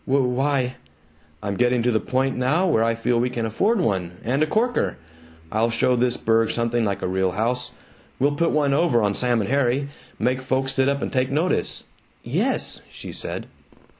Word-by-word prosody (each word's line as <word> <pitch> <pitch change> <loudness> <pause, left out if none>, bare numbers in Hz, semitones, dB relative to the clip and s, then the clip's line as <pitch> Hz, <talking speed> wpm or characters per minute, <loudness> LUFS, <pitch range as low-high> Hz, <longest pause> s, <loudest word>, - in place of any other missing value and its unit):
"W 135 -1 +3
why 130 0 0 0.3
" 80 0 -27
"I'm 100 -1 -2
getting 125 -1 +2
to 125 - +2
the 110 - +2
point 130 +3 0
now 135 +9 +2
where 115 -11 +3
I 115 0 +1
feel 120 +1 +1
we 125 +1 +1
can 120 -2 -3
afford 200 - +1
one 95 - -1
and 130 +5 0
a 155 - +3
corker! 235 +8 0 0.5
I'll 110 +2 +2
show 120 +2 +2
this 125 0 +1
burg 115 0 +2
something 115 0 0
like 100 -2 -2
a - - 0
real 95 0 0
house! 125 +4 -1 0.4
We'll 140 +3 +2
put 165 +3 +1
one 145 -2 +2
over 140 -7 +3
on 100 -1 +2
Sam 120 0 +2
and 100 - -3
Harry! 140 0 +1 0.3
Make 130 +1 0
folks 130 +1 0
sit 135 0 +2
up 140 0 -1
an' - - -3
take 130 0 +1
notice!" 155 +6 0 0.4
"Yes," - - -1
she - - -9
said. - - -5
125 Hz, 195 wpm, -23 LUFS, 115-140 Hz, 0.5 s, W